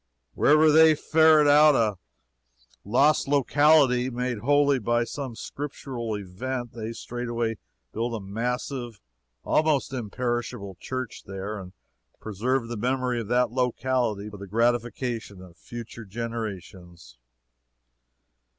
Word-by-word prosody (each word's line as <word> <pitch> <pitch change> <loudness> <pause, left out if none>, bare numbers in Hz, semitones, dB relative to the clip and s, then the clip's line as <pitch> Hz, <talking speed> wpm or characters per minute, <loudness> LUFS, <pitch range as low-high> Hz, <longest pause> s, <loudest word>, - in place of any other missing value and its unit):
Wherever 155 +1 +5
they 160 0 +7
ferret 160 0 +4
out 150 0 +6
a 105 -6 +1 0.8
lost 135 +10 +3
locality 140 -2 +4
made 125 -2 -3
holy 145 +2 +3
by 120 +1 +1
some 130 0 -6
Scriptural 125 -4 -5
event, 120 +6 -5
they 115 -1 -5
straightway 115 -1 -4 0.3
build 115 +1 -2
a - - -4
massive 120 +3 -4 0.4
almost 150 -3 +1
imperishable 120 -4 -3
church 130 -3 -6
there, 100 +2 -5
and 90 -1 -10 0.5
preserve 115 +4 -2
the 120 -1 -5
memory 125 +1 -1
of 110 - -7
that 125 +1 +2
locality 125 -4 -1
for 105 -1 -9
the 100 0 -9
gratification 115 -1 -1
of 90 -2 -14
future 115 +2 -9
generations. 95 - -7
120 Hz, 115 wpm, -26 LUFS, 110-130 Hz, 0.8 s, they